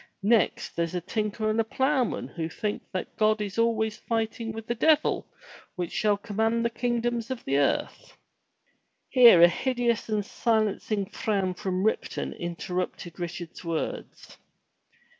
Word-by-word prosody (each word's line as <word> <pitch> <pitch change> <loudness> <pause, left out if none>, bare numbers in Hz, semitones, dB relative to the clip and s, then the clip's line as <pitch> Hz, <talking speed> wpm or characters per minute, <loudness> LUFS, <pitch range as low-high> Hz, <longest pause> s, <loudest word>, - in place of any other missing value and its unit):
Next 225 +2 +2
there's 170 +1 -1
a - - +1
tinker 215 +3 -2
and 215 +1 +2
a - - +1
ploughman 260 +2 0
who 165 -1 -4
think 205 +5 -3
that 185 - -5
God 215 0 +3
is 205 +1 -3
always 220 -2 +1
fighting 225 0 -2
with 220 0 -7
the 235 - -1
devil 310 +6 +2 0.5
which 175 -2 -3
shall 210 -1 +2
command 225 +3 0
the 235 - +1
kingdoms 240 -1 -1
of 260 -2 -5
the 140 +1 +2
earth 140 - -1 0.3
— - - -44
" - - -49 0.3
Here 235 -10 +8
a - - +11
hideous 240 +3 -1
and 210 -2 0
silencing 215 -3 0
frown 195 -4 -1
from 185 0 -2
Ripton 220 - -1
interrupted 175 0 -4
Richard's 175 0 -6
words. 165 -2 -5
215 Hz, 150 wpm, -27 LUFS, 185-230 Hz, 0.5 s, a